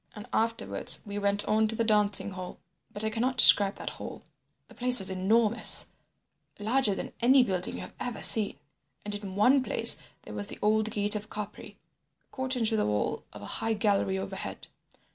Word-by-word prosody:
"And 210 -1 -11
afterwards 230 +1 -2
we 205 0 -7
went 200 0 -2
on 220 +1 0
to 225 - -4
the 230 - -2
dancing 210 -2 -1
hall. 185 -1 -10 0.3
But 205 - -6
I 220 - -3
cannot 250 +4 -3
describe 200 -4 +5
that - - -8
hall. - - -11 0.4
The - - -19
place 250 0 +1
was 190 -1 -1
enormous—larger 215 +2 +3
than - - -8
any 255 +2 +3
building 185 -5 -2
you 90 - -8
have 90 - -12
ever 245 -2 -7
seen—and 200 0 +2
in 200 -2 -9
one 255 +7 +2
place - - +3 0.3
there - - -12
was 205 - -6
the - - -8
old 215 +1 -1
gate 210 -1 +2
of 210 +1 -7
Capri, 210 -2 -10 0.5
caught 260 0 -5
into 225 -2 -2
the 215 - -2
wall 105 0 -4
of 105 - -13
a 225 - -4
gallery 200 -2 -1
high 190 - -5
overhead. 195 0 -8
210 Hz, 180 wpm, -26 LUFS, 200-225 Hz, 0.5 s, describe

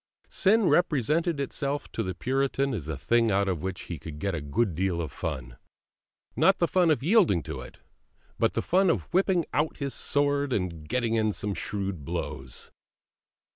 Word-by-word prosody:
Sin 210 0 +3
represented 160 0 +2
itself 140 +1 -2
to - - -2
the 95 -4 -3
Puritan 135 +3 0
as 85 - -4
a 80 -3 -3
thing 115 +11 +2
out 100 0 +2
of 90 -5 -1
which 95 0 -4
he 85 -4 -6
could 75 +1 -8
get 100 +5 -2
a 85 - -3
good 95 +8 0
deal 90 +1 -1
of 80 -4 -3
fun; 60 -1 -5 0.8
not 195 - +4
the 170 - +2
fun 180 -1 +3
of 145 -5 +2
yielding 170 - +4
to - - -6
it, - - -11 0.6
but - - +2
the - - 0
fun 190 +1 +3
of 165 - -1
whipping 185 -2 +3
out 155 +2 0
his 140 -2 -3
sword 145 -1 0
and 85 -6 -3
getting 120 0 0
in 110 -1 +2
some 100 0 -3
shrewd 95 -5 -3
blows. 65 -1 -6
115 Hz, 180 wpm, -27 LUFS, 90-150 Hz, 0.8 s, not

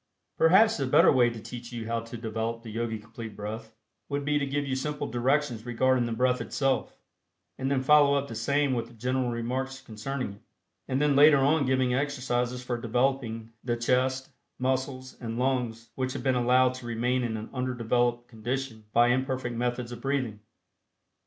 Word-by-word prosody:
Perhaps 195 +7 +5
the 135 -3 -1
better 155 +7 +6
way 125 -3 +4
to 115 -1 -7
teach 120 +2 -8
you 115 -2 -5
how 115 +1 -1
to 115 +1 -8
develop 115 +1 -3
the 115 - -8
Yogi 115 0 -2
Complete 115 0 -9
Breath, 110 +2 -7 0.3
would 140 0 -2
be 150 0 +2
to 140 - -1
give 145 +1 -1
you 135 -1 -1
simple 145 +2 -3
directions 125 0 0
regarding 120 +1 +2
the - - -4
breath 125 +2 +1
itself, 135 -2 -1 0.6
and 135 0 -1
then 135 -2 +1
follow 145 0 +6
up 140 0 0
the 115 - -7
same 140 +5 +1
with 115 -1 -4
general 125 +2 0
remarks 130 +3 -3
concerning 115 +1 -5
it, 100 - -17 0.5
and 130 - 0
then 145 -1 +3
later 145 +1 +7
on 140 +1 +3
giving 130 -1 +2
exercises 125 -2 -1
for 125 -1 -3
developing 120 -2 -1
the 120 -1 -1
chest, 130 +2 0 0.3
muscles 130 0 -2
and 115 -1 -4
lungs 125 -3 -1
which 130 0 -2
have 140 - -5
been 130 -1 +2
allowed 125 +1 +3
to 130 -2 -8
remain 120 +2 0
in 115 -2 -2
an 110 - -8
undeveloped 120 -1 0
condition 115 0 -4
by 120 +1 +5
imperfect 130 -1 -1
methods 120 0 -2
of 120 - -8
breathing. 130 -6 -1
125 Hz, 180 wpm, -28 LUFS, 115-135 Hz, 0.6 s, later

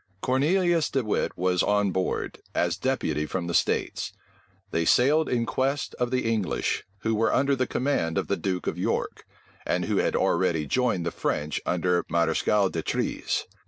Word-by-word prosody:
Cornelius 165 - +2
De 135 - 0
Wit 105 - -1
was 90 0 +2
on 105 -1 +2
board, 95 0 -2 0.2
as - - +1
deputy 75 0 -1
from 90 +1 -3
the 85 - -3
states. - - 0 0.6
They 85 - +1
sailed 145 - +4
in 120 -2 +1
quest 135 +4 -1
of 125 -1 +1
the 130 -2 0
English, 110 -5 0 0.2
who 115 - 0
were 110 +1 +2
under 140 +1 +2
the 130 -1 0
command 100 - 0
of - - -1
the 100 - +1
duke 95 -3 -2
of - - -2
York, - - -2 0.4
and - - 0
who - - 0
had - - +1
already 80 -3 +1
joined 115 - 0
the - - -1
French 75 0 -2
under 90 0 +1
Mareschal 95 +4 +2
D'Etrées. 80 - -1
105 Hz, 165 wpm, -26 LUFS, 90-130 Hz, 0.6 s, sailed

